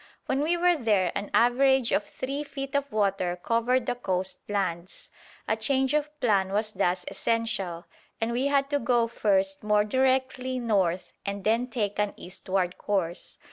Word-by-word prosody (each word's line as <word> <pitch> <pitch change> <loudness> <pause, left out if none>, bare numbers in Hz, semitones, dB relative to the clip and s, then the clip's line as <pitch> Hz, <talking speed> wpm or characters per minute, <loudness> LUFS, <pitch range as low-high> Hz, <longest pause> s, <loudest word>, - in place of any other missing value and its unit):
When 265 - 0
we 335 +4 +1
were 355 0 +4
there 210 - +2
an 200 - -4
average 260 +1 +4
of 205 - +1
three 275 +6 -4
feet 275 -1 -6
of 280 0 -1
water 195 -4 0
covered 235 +6 +1
the - - 0
coast 190 -6 -2
lands. 185 -3 -3 0.4
A 220 - +2
change 265 +4 +1
of 300 0 -1
plan 200 -6 +2
was 215 +2 0
thus 180 -2 0
essential, 200 -7 -2 0.3
and 225 +1 -1
we 250 +4 +1
had 280 -1 +2
to 285 - +2
go 235 -1 +2
first 195 -4 +1
more 210 0 +3
directly 260 +2 +1
north 195 -7 0
and 200 0 -4
then 230 +4 +2
take 210 -5 -2
an 210 -1 0
eastward 185 0 -3
course. 185 -4 -2
225 Hz, 165 wpm, -27 LUFS, 195-260 Hz, 0.4 s, were